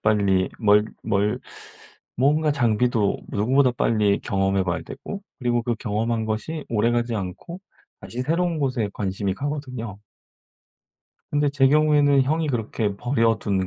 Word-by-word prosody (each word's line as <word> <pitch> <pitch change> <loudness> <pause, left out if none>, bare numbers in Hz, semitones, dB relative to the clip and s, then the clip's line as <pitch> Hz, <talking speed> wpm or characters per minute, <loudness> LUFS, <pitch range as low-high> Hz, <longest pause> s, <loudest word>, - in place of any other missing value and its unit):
빨리 100 -3 +2
뭘 105 0 +5 0.2
뭘 100 +1 0 0.8
뭔가 150 +4 +2
장비도 120 -4 +1
누구보다 125 +5 +2
빨리 105 -4 +2
경험해 95 0 0
봐야 90 -1 -2
되고 200 0 -8 0.2
그리고 120 -2 0
그 120 -1 -1
경험한 110 +1 -1
것이 145 +9 -3
오래 115 +1 +2
가지 120 0 0
않고 105 - -6 0.4
다시 120 - -6
새로운 170 +3 0
곳에 130 -7 -1
관심이 95 -1 -2
가거든요. 130 -7 -5 1.3
근데 145 0 +2
제 135 -1 +3
경우에는 145 -2 +4
형이 155 +4 0
그렇게 110 -4 -2
버려둔 115 -6 +1
115 Hz, 290 characters per minute, -23 LUFS, 105-140 Hz, 1.3 s, 뭘